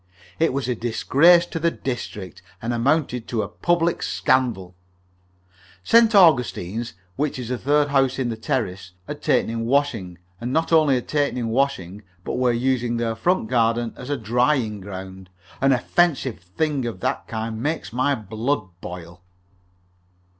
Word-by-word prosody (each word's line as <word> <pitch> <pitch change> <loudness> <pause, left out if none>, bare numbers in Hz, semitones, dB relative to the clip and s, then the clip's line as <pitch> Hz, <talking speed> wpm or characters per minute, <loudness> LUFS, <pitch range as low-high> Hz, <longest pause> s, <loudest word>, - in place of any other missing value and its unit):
It 165 - +3
was 135 -1 -2
a 125 - +1
disgrace 140 +9 +4
to 165 - -5
the 170 +1 +2
district, 105 - -6 0.2
and 115 +1 -3
amounted 125 -1 0
to 110 -3 -1
a - - -4
public 170 - 0
scandal. 120 -9 0 1.1
St. 230 - +5
Augustine's 120 - +3 0.2
which 145 0 -1
is 125 -2 -6
the 125 - -1
third 145 +2 +2
house 135 -2 +2
in 130 -3 -1
the 115 - -3
terrace 95 -5 -3
had - - -6
taken - - +1
in 115 0 -3
washing, 120 -10 0 0.2
and 120 +1 -4
not 160 +4 0
only 155 -4 +5
had 125 - -3
taken 145 -3 0
in 115 -2 -2
washing, 110 -7 -1 0.2
but - - -3
were 125 -1 +3
using 120 -1 0
their 115 -1 -1
front 175 +2 +1
garden 115 -1 +1
as 125 - -9
a 145 - 0
drying 120 -1 +1
ground! 95 -1 -9 0.3
An 135 0 +4
offensive 135 0 +1
thing 135 - -2
of 115 - -6
that 130 +1 -2
kind 110 -1 -4
makes 150 -3 -3
my 135 +3 +1
blood 110 +1 -2
boil. 90 0 -9
125 Hz, 160 wpm, -23 LUFS, 110-140 Hz, 1.1 s, St